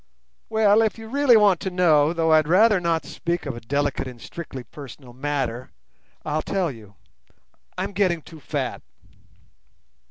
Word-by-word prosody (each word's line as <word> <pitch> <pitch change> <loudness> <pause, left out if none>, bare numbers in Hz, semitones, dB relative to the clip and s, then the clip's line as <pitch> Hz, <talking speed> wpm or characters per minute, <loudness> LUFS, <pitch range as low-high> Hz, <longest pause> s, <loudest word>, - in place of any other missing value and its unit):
"Well, 220 -1 +4
if 220 0 0
you 225 0 -9
really 265 -1 +4
want 200 -5 +4
to 190 - -3
know, 160 -5 +3
though 165 -2 +2
I'd 155 -1 +4
rather 205 +4 +5
not 170 -2 -1
speak 170 0 -3
of 140 -4 -4
a 120 - -8
delicate 140 +2 -1
and 125 -2 -10
strictly 135 -2 -8
personal 130 0 -12
matter, 130 -3 -3 0.6
I'll 155 +1 -1
tell 185 -4 -1
you: 105 -5 -14 0.8
I'm - - -2
getting 185 -5 0
too 160 - -13
fat." - - -4
160 Hz, 155 wpm, -23 LUFS, 140-195 Hz, 0.8 s, rather